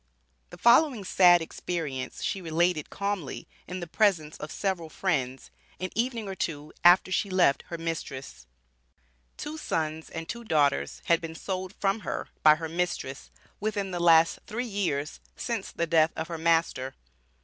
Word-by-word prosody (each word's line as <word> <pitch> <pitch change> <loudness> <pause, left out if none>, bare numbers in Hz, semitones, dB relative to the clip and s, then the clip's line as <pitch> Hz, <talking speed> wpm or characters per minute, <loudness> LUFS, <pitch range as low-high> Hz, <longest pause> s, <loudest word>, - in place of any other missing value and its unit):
The - - -11
following 240 -1 +5
sad 175 -2 +6
experience 155 -6 -4
she 195 - -1
related 165 -1 +1
calmly, 200 -7 -3 0.2
in 180 0 -5
the - - -3
presence 165 -5 +2
of 150 - -7
several 185 -5 -2
friends, 135 -8 -2 0.3
an 185 0 -3
evening 230 -1 -1
or 195 - -4
two 155 -5 -4
after 175 +2 +6
she 200 +2 0
left 185 -7 +3
her 170 - -5
mistress: 140 - -5 0.9
Two 310 +1 -5
sons 160 - -2
and 165 0 -6
two 235 0 -6
daughters 150 -9 +1
had 170 -1 +3
been 165 -1 -6
sold 185 +2 -4
from 195 +2 +1
her - - -4
by 155 -1 +8
her 160 +1 -5
mistress, 165 -5 -3 0.3
within 205 -2 -2
the 175 - -3
last 165 -1 +5
three 240 +4 -3
years, 180 -9 -2 0.2
since 230 -5 -3
the 170 - -1
death 160 -1 +3
of 160 +1 -4
her 165 -1 -4
master. 165 -5 +1
170 Hz, 160 wpm, -28 LUFS, 155-195 Hz, 0.9 s, by